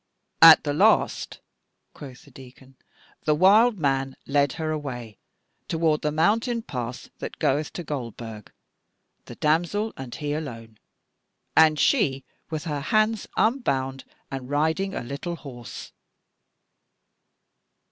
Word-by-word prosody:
"At 165 -1 +10
the 145 - -1
last," - - +2 0.5
quoth 130 -3 -11
the - - -18
Deacon, 130 0 -15 0.5
"the 150 - +3
wild 210 +7 +5
man 135 -4 -1
led 140 -1 +1
her 160 -1 -3
away 125 -8 -6 0.5
toward 160 -2 +1
the 150 - 0
mountain 225 - +1
pass 120 - -6
that - - -6
goeth 145 +3 0
to 175 - -5
Goldburg, 115 -7 -7 0.7
the - - -10
damsel 175 +8 0
and 130 -2 -8
he 145 -2 -3
alone, 115 -8 -7 0.8
and 155 -1 +5
she 135 - +2 0.2
with 155 -2 -4
her 150 -4 -3
hands 215 +6 +1
unbound 135 - 0 0.3
and 135 -1 -6
riding 160 +7 0
a - - -4
little 140 +7 -5
horse." 125 -7 -10
150 Hz, 120 wpm, -25 LUFS, 130-165 Hz, 0.8 s, At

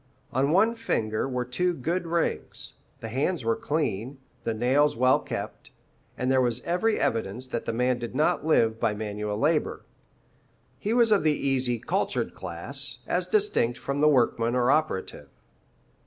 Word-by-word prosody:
On 135 +2 +2
one 205 +8 +4
finger 115 - -1
were 125 -1 -2
two 175 +8 0
good 170 +6 -2
rings, 170 0 -2 0.3
the 115 - -5
hands 135 +4 -1
were 115 0 +2
clean, 135 -4 -2 0.3
the 115 - 0
nails 130 +5 +2
well 130 +2 +4
kept, - - -6 0.5
and 125 +1 0
there 130 -1 +4
was 120 -1 0
every 180 +6 +1
evidence 115 +2 -1
that 120 -2 -4
the - - -1
man 125 +2 +1
did 120 +1 -6
not 150 +1 +2
live 115 -8 +2
by 105 - +1
manual 105 0 -3
labour. 150 +5 0 0.9
He 210 - -2
was 235 -1 +4
of 205 - +5
the 155 -1 +2
easy, 130 -3 0
cultured - - -1
class, 125 +8 -2
as 180 +5 -1
distinct 190 - +1
from 140 +1 -3
the 150 - +6
workman 120 -3 +2
or 125 0 +3
operative. 155 -12 -1
130 Hz, 160 wpm, -26 LUFS, 115-160 Hz, 0.9 s, the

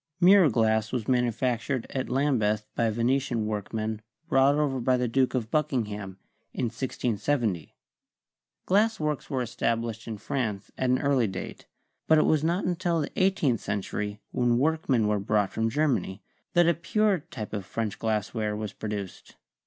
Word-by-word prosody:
Mirror 185 -2 +7
glass 110 -1 +1
was 120 -4 -2
manu 125 -2 +3
factured 120 +2 -1
at 130 -1 -3
Lambeth 115 -6 +1
by 115 -1 +2
Venetian 120 0 0
workmen 110 +1 -3 0.3
brought 135 +2 +4
over 145 -3 0
by 125 +1 +2
the 125 0 0
Duke 130 +2 +1
of 115 -3 -2
Buckingham 105 -10 -1 0.4
in - - 0
1670. 115 - -2 0.9
Glass 220 +4 +2
works 150 -2 -2
were 130 -2 -1
established 115 -1 -2
in 110 -2 -4
France 105 -4 -3
at 130 - -1
an 125 - +4
early 135 -5 +2
date, 95 -1 -7 0.4
but 160 - +6
it 155 - +4
was 155 -1 +2
not 170 +4 +1
un 180 -1 0
til 170 -3 0
the 145 - -4
eighteenth 185 - +2
century, 105 +1 -3
when 120 -2 +2
workmen 135 -5 +2
were 105 -1 +1
brought 105 0 0
from 115 0 0
Germany, 135 -8 0 0.3
that 175 -1 +5
a 170 - +5
pure 195 +1 +1
kind 110 -8 -7
of 100 -2 -3
French 110 +2 -4
glass 110 -1 -1
ware 105 -2 -1
was 105 -2 -5
produced. 105 -3 -6
120 Hz, 165 wpm, -27 LUFS, 110-145 Hz, 0.9 s, Mirror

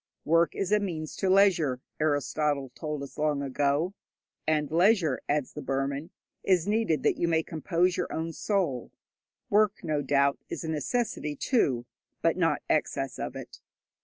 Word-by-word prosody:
'Work 165 +2 +3
is 195 0 -2
a 210 - +5
means 165 -6 -4
to 190 - 0
leisure,' 180 -9 +4 0.2
Aristotle 145 -1 0
told 150 -2 -4
us 140 - -10
long 150 -2 +1
ago, 145 +6 0 0.5
and 150 -2 +1
leisure, 175 - +3
adds 145 -2 0
the 150 - -6
Burman, 140 +3 -2 0.3
is 185 -2 +2
needed 210 -7 +1
that - - +2
you 170 - +2
may 165 -1 +2
compose 175 +3 0
your - - -2
own 165 +1 -3
soul. 170 - -1 0.6
Work, 210 -1 +3
no 155 -3 0
doubt, 140 0 +2
is - - -5
a 160 - -4
necessity, 160 - -1
too, 135 - +1 0.4
but - - +3
not - - +1
excess - - -1
of - - -4
it. - - -9
155 Hz, 160 wpm, -28 LUFS, 145-185 Hz, 0.6 s, a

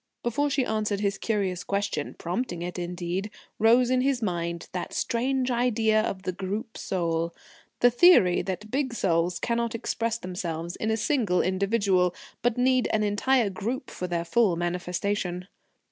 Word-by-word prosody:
Before 285 +5 +1
she 275 -2 +1
answered 215 -2 -1
his 200 -1 0
curious 195 -5 -1
question 200 +1 -2
prompting 175 -1 -3
it 180 +1 -5
indeed 175 +3 -3 0.3
rose 240 +3 +5
in 255 0 +3
his 270 -1 +1
mind 170 -5 -3
that 180 - -4
strange 255 +2 0
idea 225 -3 +2
of 190 -3 -3
the 185 - -1
Group 205 +6 -5
Soul: 170 -2 -2 0.5
the 245 - +6
theory 240 - +6
that 200 +3 -5
big 260 -3 -1
souls 170 -3 +1
cannot 235 -1 -1
express 230 0 -1
themselves 175 -3 -4
in 220 - -2
a 220 - +1
single 225 -8 +1
individual, 190 -1 +1 0.3
but 245 -1 +1
need 255 0 +3
an 215 -1 +1
entire 210 +2 +2
group 235 +7 -4
for 180 - -4
their 170 -1 -2
full 195 +1 +3
manifestation. 180 +1 -2
205 Hz, 155 wpm, -27 LUFS, 180-235 Hz, 0.5 s, the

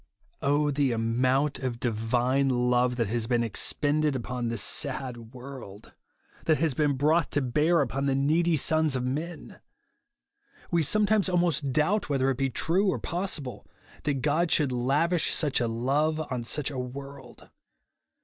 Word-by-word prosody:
Oh 145 +1 +2
the 140 -1 +1
ptmount 125 +5 0
of 125 -3 -3
divine 120 +4 0
love 125 0 +1
that 120 -2 0
has 115 0 -1
been 120 -1 +1
expended 145 +6 +1
upon 125 -1 -3
this 115 -2 -1
sad 125 -5 -2
world; 125 -6 -10 0.3
— - - -28
that 155 -2 +3
has 160 -3 +1
been 145 +1 +1
brought 150 +4 +2
to 145 - +2
bear 150 +6 +2
upon 135 +1 -2
the 135 - +1
needy 160 +4 +2
sons 155 0 +1
of 125 - -1
men! 150 +5 -5 1.1
We 170 - +3
sometimes 210 +4 +2
almost 170 -6 0
doubt 155 +8 +1
whether 135 -1 +1
it 130 - -3
be 135 0 +1
true 175 - +1
or - - 0
possible, 165 - -3 0.3
that 140 -3 -2
God 155 +3 +1
should 145 -5 +3
lavish 145 +8 +1
such 150 -4 +1
a 120 - +1
love 140 +7 0
on 120 -2 -3
such 150 +4 0
a 135 - -5
world. 135 0 -9
140 Hz, 160 wpm, -27 LUFS, 125-155 Hz, 1.1 s, that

